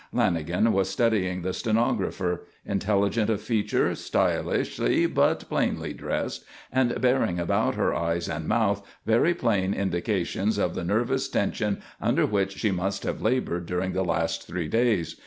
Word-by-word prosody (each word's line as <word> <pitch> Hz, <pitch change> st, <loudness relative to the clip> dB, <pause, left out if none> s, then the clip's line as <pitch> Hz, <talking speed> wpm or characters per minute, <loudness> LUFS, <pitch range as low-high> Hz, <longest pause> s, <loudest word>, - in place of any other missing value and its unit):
Lanagan 85 Hz, +7 st, +1 dB
was 95 Hz, -2 st, +1 dB
studying 95 Hz, -5 st, +1 dB
the 95 Hz, 0 st, -1 dB
stenographer: 100 Hz, -4 st, 0 dB, 0.2 s
intelligent 100 Hz, +2 st, +1 dB
of 110 Hz, -3 st, +1 dB
feature, 110 Hz, -1 st, +1 dB
stylishly -, -, 0 dB
but -, -, +1 dB
plainly -, -, -1 dB
dressed, -, -, -3 dB, 0.3 s
and 130 Hz, -2 st, +1 dB
bearing 125 Hz, -8 st, +2 dB
about 85 Hz, -, +1 dB
her -, -, +1 dB
eyes 85 Hz, 0 st, -1 dB
and 75 Hz, 0 st, -4 dB
mouth 105 Hz, -3 st, +1 dB, 0.2 s
very 115 Hz, +10 st, +3 dB
plain 100 Hz, -5 st, +1 dB
indications 100 Hz, +2 st, -1 dB
of 90 Hz, -4 st, 0 dB
the -, -, -4 dB
nervous 120 Hz, +8 st, 0 dB
tension 105 Hz, 0 st, -1 dB, 0.2 s
under -, -, +2 dB
which 100 Hz, -2 st, 0 dB
she 110 Hz, -, +1 dB
must 95 Hz, +2 st, -2 dB
have -, -, -3 dB
laboured 110 Hz, -8 st, 0 dB
during 90 Hz, +2 st, -1 dB
the 95 Hz, -, 0 dB
last 80 Hz, -1 st, -1 dB
three 85 Hz, -2 st, -3 dB
days. 115 Hz, -5 st, +1 dB
100 Hz, 145 wpm, -26 LUFS, 90-110 Hz, 0.3 s, very